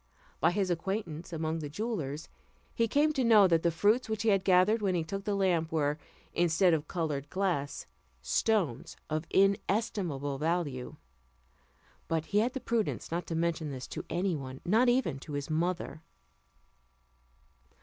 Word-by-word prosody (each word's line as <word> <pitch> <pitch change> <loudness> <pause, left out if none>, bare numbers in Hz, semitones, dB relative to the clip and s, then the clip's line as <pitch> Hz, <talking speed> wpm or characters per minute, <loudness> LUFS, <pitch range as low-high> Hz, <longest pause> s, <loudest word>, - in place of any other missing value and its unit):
By 160 - +4
his 190 0 0
acquaintance 175 -2 -3
among 160 0 -2
the 150 -2 -5
jewellers, 160 - -4 0.5
he 230 -1 +1
came 295 +6 +2
to 265 - 0
know 215 -4 +7
that 165 -2 +3
the 170 - +3
fruits 210 +9 +2
which 220 -1 -2
he 225 - +3
had 195 -2 +3
gathered 190 +4 +4
when 190 -3 +1
he 170 - 0
took 195 +5 -5
the 205 -2 0
lamp 175 -5 +1
were, 150 -1 0 0.3
instead 175 +1 +3
of 150 -1 -1
coloured 150 -5 -3
glass, 180 -7 -1 0.3
stones 155 - 0
of 155 +2 -2
inestimable 195 -8 +1
value; 155 -6 -2 1.1
but 160 -1 -1
he 205 - +1
had 240 +4 +1
the 265 - -3
prudence 230 -7 -2
not 170 +1 -2
to 165 - -3
mention 165 -2 -1
this 130 -2 -6
to - - -5
any 180 0 0
one, 130 -2 -7
not 225 +7 +4
even 240 - +1
to 145 - -9
his 145 +2 -3
mother. 170 0 -1
175 Hz, 160 wpm, -30 LUFS, 155-205 Hz, 1.1 s, know